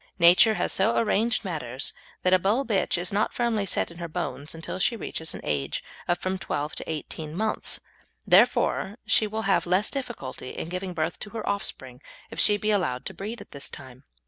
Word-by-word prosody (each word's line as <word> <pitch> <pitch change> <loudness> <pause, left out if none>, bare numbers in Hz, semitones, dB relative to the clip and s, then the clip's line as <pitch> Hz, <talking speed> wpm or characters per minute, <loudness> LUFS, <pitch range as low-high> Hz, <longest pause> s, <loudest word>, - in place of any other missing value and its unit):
Nature 180 +5 +7
has - - 0
so 210 +4 +2
arranged 225 +1 +2
matters 135 -7 -3 0.3
that 185 - +4
a 185 - +7
Bull 215 +9 +2
bitch 200 -5 +1
is 175 +3 -1
not 205 +2 +1
firmly 225 -4 +1
set 170 - +1
in 170 - -12
her 170 - -3
bones 155 -3 -3
until 165 +3 -5
she 230 - +2
reaches 160 -7 -4
an - - -7
age 70 -2 -1 0.2
of 175 - +2
from 185 +1 -2
twelve 150 -4 -2
to - - -4
eighteen 155 0 -5
months, 215 +3 -1 0.5
and - - -2
therefore 200 +3 +4
she 215 - +4
will 220 +1 -3
have 195 -3 +2
less 185 +4 +2
difficulty 235 - -5
in 160 - -4
giving 180 0 -4
birth 160 +1 -1
to 210 - -6
her 220 0 -5
offspring 130 -10 -3 0.3
if - - -6
she 210 - +5
be 215 +1 +1
allowed 140 -11 0
to 190 - -4
breed 215 +6 -6
at - - -13
this 140 -1 -6
time. 130 0 -11
185 Hz, 205 wpm, -27 LUFS, 160-210 Hz, 0.5 s, Nature